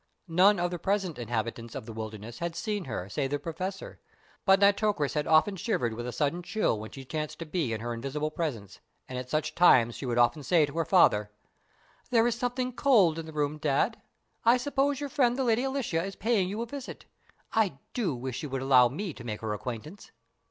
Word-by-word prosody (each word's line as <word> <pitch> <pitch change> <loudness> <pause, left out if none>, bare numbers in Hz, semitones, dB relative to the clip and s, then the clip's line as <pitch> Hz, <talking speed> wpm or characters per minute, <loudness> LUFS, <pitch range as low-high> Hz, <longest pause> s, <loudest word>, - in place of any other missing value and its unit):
None 185 +4 +5
of 175 0 0
the 175 - -4
present 195 -5 -1
inhabitants 115 0 -4
of - - -6
"The 115 - -8
Wilderness" 110 +2 -7
had 170 -1 -3
seen 200 +2 -3
her 105 -7 -4
save 135 +7 -2
the 145 - 0
Professor, 180 +6 -6 0.5
but 195 -1 +6
Nitocris 200 -6 +2
had 150 -1 -1
often 160 +6 +4
shivered 160 - -1
with 120 +2 -5
a - - -3
sudden 145 +7 -1
chill 180 - 0
when 110 +1 -7
she 135 -1 -10
chanced 155 +2 -4
to 165 - -6
be 155 -6 -1
in 110 -1 -3
her 120 +1 -3
invisible 140 +6 -3
presence, 115 - -4 0.3
and 130 -1 -5
at 125 0 -7
such 155 +2 -1
times 120 -9 +5
she 135 - -6
would 120 -1 -1
often 120 +4 +3
say 155 +3 +3
to 145 - -10
her 165 - +1
father: 105 - +4 0.8
"There 230 -2 +4
is 240 - +2
something 250 +2 -2
cold 205 - +4
in 160 - -6
the - - -8
room, 150 0 -1
Dad. 150 +10 0 0.4
I 235 +2 +6
suppose 275 +1 0
your 290 -1 -4
friend 250 -2 +2
the 265 - +1
Lady 235 0 +2
Alicia 265 -12 -1
is 195 0 -5
paying 210 -4 +1
you 215 +4 -3
a - - -4
visit. 270 +2 -8 0.5
I 205 -10 +2 0.2
do 205 - -1
wish 125 0 -5
she 150 - -4
would 135 -1 -3
allow 130 -2 +6
me 180 - -4
to 120 - -11
make 110 -3 -5
her 110 -2 -2
acquaintance." 125 - -7
160 Hz, 215 wpm, -29 LUFS, 125-205 Hz, 0.8 s, but